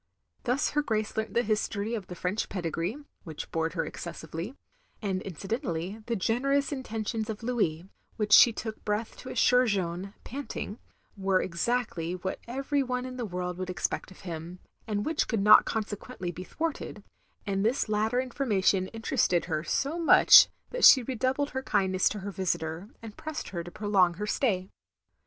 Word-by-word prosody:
Thus 255 +3 +1
her 295 - +2
Grace 220 -6 -2
learnt 220 0 -3
the 240 - +3
history 210 0 -1
of 210 -5 -4
the 180 - -7
French 180 +5 -2
pedigree 175 - -2 0.3
(which 160 -5 -7
bored 165 0 -1
her 170 - -1
excessively), 165 - -6 0.4
and 195 -4 -2
incidentally, 195 - -4
the 235 - 0
generous 275 +8 +1
intentions 225 -4 -3
of 220 +1 -5
Louis; 195 -9 0 0.3
which 210 -2 +1
she 240 - +9
took 220 0 -6
breath 210 +2 -2
to 255 - -9
assure 250 0 +4
Jeanne 190 -1 -2
(panting) 260 -4 -6 0.4
were 190 -2 +2
exactly 180 -2 -1
what 190 +1 -4
every 275 +3 -1
one 250 -1 -2
in 255 0 -7
the 240 -3 -3
world 180 -1 -4
would 185 0 -4
expect 180 - -2
of 185 - -15
him, 170 0 -6 0.3
and 205 -1 -1
which 320 -1 0
cotdd 225 -4 0
not 210 +1 +8
consequently 205 -3 -4
be 180 +2 -8
thwarted; 320 - -4 0.4
and 195 -2 -1
this 235 +4 +1
latter 215 +3 +1
information 210 -8 +1
inter 225 +4 -4
ested 175 -6 +3
her 155 -3 -2
so 280 - -1
much 330 - +8 0.2
that - - -3
she 260 - +9
redoubled 260 +3 -1
her 265 - -2
kindness 190 -7 +2
to 210 - -5
her 200 +1 -5
visitor, 175 0 -2
and 220 -2 -9
pressed 310 0 -5
her 170 -2 -4
to 175 - -8
prolong 190 -3 +2
her 210 +4 -3
stay. 195 -4 0
210 Hz, 170 wpm, -28 LUFS, 185-245 Hz, 0.4 s, she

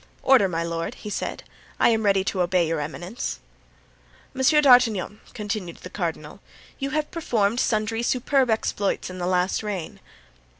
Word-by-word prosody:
"Order, 260 -7 +5
my 165 -1 -1
lord," 165 0 -3
he 210 - -8
said; - - -4 0.4
"I - - +5
am 225 -1 +2
ready 195 -2 +3
to 190 -1 -1
obey 175 -1 +2
your 165 -1 -1
eminence." 175 +9 -5 0.9
"Monsieur 270 +3 +4
d'Artagnan," 235 -7 +4 0.2
continued 205 -5 -4
the 180 - -11
cardinal, 165 -3 -4 0.4
"you 275 - -2
performed 235 -9 -1
sundry 220 0 0
superb 255 +2 +1
exploits 205 -4 -1
in 185 - -8
the 175 - -2
last 180 0 +1
reign." 200 -6 -5
205 Hz, 145 wpm, -24 LUFS, 180-235 Hz, 0.9 s, Order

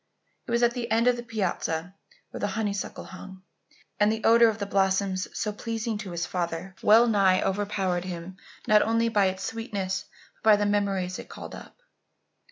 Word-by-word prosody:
It - - -5
was 235 +1 +2
at 240 - +5
the 240 -2 -4
end 225 +2 +2
of 250 0 +4
the 240 - -5
piazza 185 -6 -2 0.4
where - - -7
the 205 - 0
honeysuckle 205 -3 -3
hung, 190 0 -11 0.6
and 210 0 +4
the 220 0 -3
odour 230 0 +6
of 220 - -3
the 205 - -3
blossoms, 190 -1 +1
so 210 -2 -3
pleasing 225 0 -3
to 200 -3 -6
his 170 -1 -3
father, 175 +1 -3
well 225 +3 +6
nigh 195 -4 +3
overpowered 195 -2 -1
him 180 +1 -7 0.3
not 210 0 +5
only 230 +1 +2
by 205 -3 +3
its 190 0 -3
sweetness 200 -5 -3 0.3
but - - -35
by 220 -1 +7
the 205 0 0
many 205 0 +2
memories 185 -2 -3
it - - -10
called - - -9
up. - - -12
205 Hz, 190 wpm, -27 LUFS, 185-225 Hz, 0.6 s, by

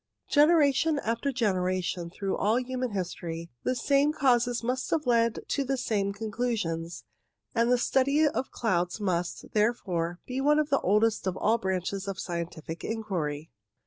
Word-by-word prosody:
Generation 300 0 +4
after 235 +2 -1
generation, 185 -6 -1
through 195 +2 -3
all 215 +3 +2
human 255 0 -3
history, 170 -4 -5
the 255 - 0
same 280 +3 +3
causes 245 -4 +2
must 255 +2 -1
have 310 -2 0
led 230 -2 +2
to 280 - +1
the 270 0 -1
same 200 -5 0
conclusions; 205 -6 -3 0.5
and 235 +1 +2
the 250 - +5
study 275 +5 +3
of 265 -2 -2
clouds 180 -4 -1
must, 180 -4 -2
therefore, 185 -6 0
be 260 +1 -3
one 295 +2 +4
of 305 -1 +1
the 275 - +3
oldest 210 +1 +2
of 185 - -1
all 225 +2 +2
branches 190 +1 -2
of 195 -1 -3
scientific 170 -1 -5
inquiry. 170 -9 -3
220 Hz, 150 wpm, -28 LUFS, 180-255 Hz, 0.5 s, the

